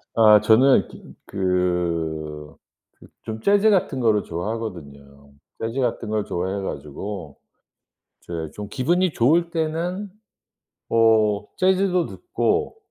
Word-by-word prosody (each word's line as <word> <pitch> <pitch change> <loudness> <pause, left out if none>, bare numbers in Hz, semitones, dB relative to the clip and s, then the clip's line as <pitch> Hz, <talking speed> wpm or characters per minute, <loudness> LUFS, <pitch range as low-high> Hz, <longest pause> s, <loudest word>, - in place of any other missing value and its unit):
아 105 -2 +7
저는 120 +5 +4
좀 - - -14
그 85 -5 -2 0.4
그 - - -16 0.2
좀 110 0 -6
재즈 205 +2 +4
같은 165 -8 +1
거를 110 -4 +2
좋아하거든요. 75 -8 -7 0.3
재즈 115 +4 -3
같은 115 -2 -2
걸 110 -1 0
좋아해 95 +3 -3
가지고 80 +1 -6 0.9
이제 80 -2 -6
좀 105 -1 -7
기분이 175 +6 +1
좋을 165 +8 +2
때는 170 +5 -2 0.8
뭐 110 -2 +3
재즈도 185 -1 +2
듣고 360 +4 -2
110 Hz, 215 characters per minute, -22 LUFS, -, 0.9 s, 아